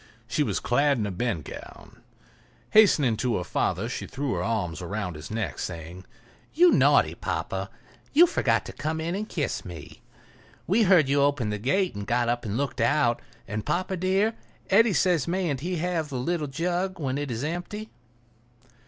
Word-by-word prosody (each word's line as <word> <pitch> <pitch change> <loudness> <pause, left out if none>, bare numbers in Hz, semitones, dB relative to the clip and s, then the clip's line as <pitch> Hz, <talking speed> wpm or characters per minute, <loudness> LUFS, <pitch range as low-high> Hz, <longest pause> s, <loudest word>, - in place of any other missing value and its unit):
She 120 +5 -1
was 145 - 0
clad 140 +3 +2
in 110 - -1
a 100 - -3
bedgown. 95 - -5 0.7
Hastening 150 - +5
to 120 0 0
her 90 - -2
father - - -1
she - - -5
threw 140 -1 -3
her 85 - -2
arms 90 -6 -2
about 90 0 -3
his 75 0 -9
neck, 110 -1 -3
saying: 85 +1 -6 0.5
"You 350 +2 +6
naughty - - +4
papa, - - -3 0.4
you 330 +5 +7
forgot 355 - +1
to - - -8
come 155 +2 -3
in 165 +2 -2
and 210 +3 -4
kiss 150 -5 -2
me. 85 -5 -10 0.6
We 205 +6 +2
heard 185 -8 +5
you 140 +1 +2
open 140 -6 +1
the 105 - -3
gate 180 - +1
and 100 -1 -6
got 120 0 +1
up 120 0 -1
and 105 +1 -2
looked 135 -3 -2
out. 120 -1 +2 0.3
And, 110 0 -3
papa 185 +2 -1
dear, 190 +5 +1 0.4
Eddy 220 +2 +5
says 175 -5 +2
mayn't 170 -6 -1
he 180 +6 -3
have 165 -2 -1
the 135 - -4
little 155 +4 -1
jug 175 +6 -2
when 135 -2 -1
it 145 -1 -3
is 120 +1 -3
empty?" 175 +7 -4
140 Hz, 180 wpm, -26 LUFS, 110-180 Hz, 0.7 s, you